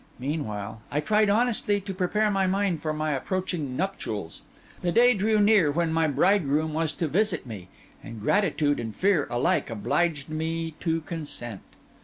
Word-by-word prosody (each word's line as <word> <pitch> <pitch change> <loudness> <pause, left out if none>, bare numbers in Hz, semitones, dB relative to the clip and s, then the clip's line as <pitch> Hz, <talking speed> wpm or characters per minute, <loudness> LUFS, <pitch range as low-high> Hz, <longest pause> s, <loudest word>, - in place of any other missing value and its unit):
Meanwhile, 110 -7 -4
I 145 - -1
tried 210 +6 +2
honestly 215 -2 +2
to 195 0 -5
prepare 210 +3 +1
my 195 -1 +1
mind 190 -4 0
for 155 - -1
my 155 0 -1
approaching 155 -2 -2
nuptials. 110 - -4 0.4
The 175 - 0
day 245 +5 +5
drew 215 +1 +1
near 205 -6 +5
when 165 +2 0
my 165 -1 +2
bridegroom 155 -1 +2
was 160 0 0
to 165 - -2
visit 185 0 0
me, 105 -7 -8 0.4
and 115 -1 -8
gratitude 150 - +1
and 115 -2 -5
fear 190 -6 +2
alike 120 0 +1
obliged 145 +7 -1
me 160 +1 -3
to 165 -1 -1
consent. 145 - -6
165 Hz, 160 wpm, -26 LUFS, 145-195 Hz, 0.4 s, day